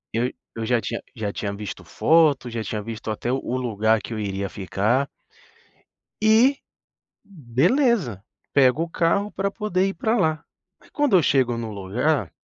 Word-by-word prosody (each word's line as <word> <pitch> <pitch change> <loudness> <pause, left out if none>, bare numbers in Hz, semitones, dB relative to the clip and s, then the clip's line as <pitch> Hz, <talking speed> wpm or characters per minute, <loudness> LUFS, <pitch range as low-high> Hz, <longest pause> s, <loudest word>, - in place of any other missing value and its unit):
Eu 125 +3 +1 0.2
eu 115 - -4
já 120 -1 +3
tinha 115 - -4
já 105 -3 -3
tinha 100 -1 -3
visto 100 -1 -7
foto, 155 -5 +3
já 115 -2 -4
tinha 110 - -3
visto 110 0 -6
até 110 +3 -2
o 135 - 0
o 125 - -2
lugar 110 -3 +1
que 115 - -7
eu 110 - -4
iria 100 -1 -2
ficar 105 +8 0 1.1
e, 230 +6 +5 0.6
beleza, 170 - +1 0.3
pego 140 +3 +4
o 170 - -6
carro 175 +5 +1
pra 195 0 -2
poder 195 -3 0
ir 195 - -2
pra 220 +6 0
lá. 155 -5 +1 0.4
Mas - - -22
quando 290 -10 +3
eu 170 - +3
chego 130 -3 +2
no 115 -1 -4
lugar, 105 - -1
125 Hz, 170 wpm, -23 LUFS, 110-175 Hz, 1.1 s, e